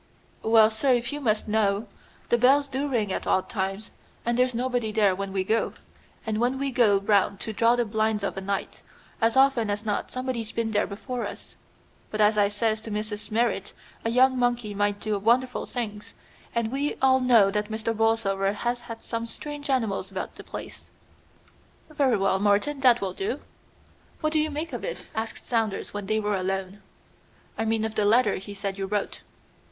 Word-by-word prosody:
"Well, 220 -1 +5
sir, 255 +4 +2
if 240 +1 0
you 295 - -4
must 220 -5 0
know, 210 0 +1 0.4
the 240 - +4
bells 275 +4 +5
do 275 +2 -2
ring 220 -8 0
at - - -4
odd 185 - +2
times, 195 0 -3 0.3
and 235 0 +1
there's 250 0 +2
nobody 245 -2 -1
there 210 -3 +3
when 195 +1 -4
we 190 -1 0
go; 220 +4 0 0.5
and 215 -1 -1
when 245 +3 +1
we 275 0 -1
go 230 -5 +4
round 200 -1 +2
to 220 - -4
draw 230 +3 +4
the 240 -1 +1
blinds 215 -1 0
of - - -2
a 195 - -4
night, 195 0 -3 0.4
as 230 +3 +3
often 265 -5 +4
as 205 +2 -2
not 210 -2 -1
somebody's 255 -3 -3
been 230 -1 -1
there 205 -1 +1
before 240 +4 -4
us. - - -10 0.6
But 215 - -4
as 210 0 +5
I 205 -1 +4
says 215 +1 0
to 225 - -8
Mrs. 210 0 -4
Merrit, 220 -3 0 0.3
a 225 - 0
young 255 +2 +4
monkey 240 -3 0
might 205 0 0
do 215 -1 -1
wonderful 245 +4 +1
things, 210 -4 -5 0.4
and 235 -1 0
we 280 +2 -1
all 260 0 +4
know 235 -6 +5
that 210 +1 -1
Mr. 225 +1 -2
Borlsover 205 -3 +1
has 240 +3 -2
had 230 -1 -9
some 230 0 -3
strange 290 +3 -6
animals 220 -8 0
about 190 -1 -5
the - - -11
place." - - -9 1.0
"Very 275 -6 +2
well, 195 -1 +1
Morton, 205 +8 +2
that 250 -3 +5
will 190 -2 -2
do." 395 +3 -3 0.8
"What 310 0 0
do 310 - +3
you 310 0 +1
make 310 +3 -4
of - - -4
it?" - - -5
asked 220 0 -4
Saunders 225 -4 -1
when 205 -1 -5
they 215 +1 +1
were 210 -1 -1
alone. 190 +1 -2 0.7
"I 225 - -2
mean 220 0 +1
of 220 - -3
the 215 - +1
letter 220 0 +4
he 200 +2 -8
said 195 -1 -4
you 195 - -2
wrote." 205 0 -2
220 Hz, 195 wpm, -26 LUFS, 205-245 Hz, 1.0 s, Well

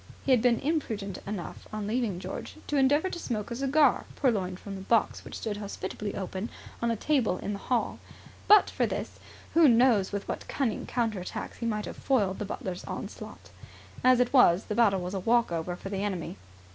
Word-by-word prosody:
He 275 - +2
had 250 -3 +5
been 240 -1 +3
imprudent 225 - -2
enough, 200 -4 -6
on 215 -1 -4
leaving 220 -3 -1
George, - - -6
to 295 - -2
endeavour 290 +7 +3
to 345 - -4
smoke 225 -7 -3
a - - -2
cigar, 275 +1 +3
purloined 190 -9 0
from 200 - -8
the 190 - -6
box 225 +3 +1
which - - -8
stood 210 -2 -3
hospitably 205 0 -5
open 190 +2 -4 0.3
on 235 - +1
a 230 - +1
table 235 -6 +1
in 205 - -4
the 200 - -5
hall. 245 +2 -1 0.5
But 420 -1 +8
for - - +1
this, - - -5 0.3
who 330 -1 +7
knows 235 -5 +4
with 200 0 -4
what - - -4
cunning 250 -7 -2
counter 225 -5 -1
attacks 180 - -6
he 235 - -2
might 210 -2 -1
have - - -7
foiled 205 -8 +1
the 210 - -2
butler's 185 -2 -5
onslaught? - - -8 0.5
As 255 -1 +6
it 250 +1 +2
was, 195 -8 +6
the - - -4
battle 205 -5 +3
was 180 +2 -4
a 195 - -1
walk 235 +1 +2
over 170 +1 -2
for 195 - -8
the 195 0 -2
enemy. 185 -3 -3
215 Hz, 205 wpm, -28 LUFS, 195-250 Hz, 0.5 s, But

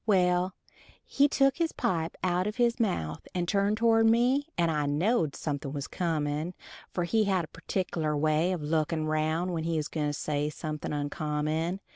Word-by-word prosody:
Well, 180 -2 +3 0.5
he 280 +1 +3
took 275 -1 +2
his 330 -1 0
pipe 165 -2 -1
out 180 +1 +1
of 210 - -3
his 240 -1 +2
mouth 80 - -1
and 175 -1 0
turned 200 +2 +2
toward 225 0 +4
me, 245 +5 +3
and 170 -2 +2
I 150 -2 0
knowed 160 - +1
something 145 -3 -3
was 140 -1 -4
comin', 160 0 -2 0.3
for 175 - -2
he 215 +5 +2
had 190 -4 +1
a - - -19
pertikkeler 165 -3 -2
way 155 +4 +2
of 175 -5 -3
lookin' 155 +1 0
round 155 +3 0
when 165 -2 -2
he 165 0 0
was 155 -1 -2
gwine 150 -2 -1
to 145 - -1
say 150 0 -1
anything 155 -2 -4
oncommon. 150 +4 -2
170 Hz, 180 wpm, -29 LUFS, 150-195 Hz, 0.5 s, toward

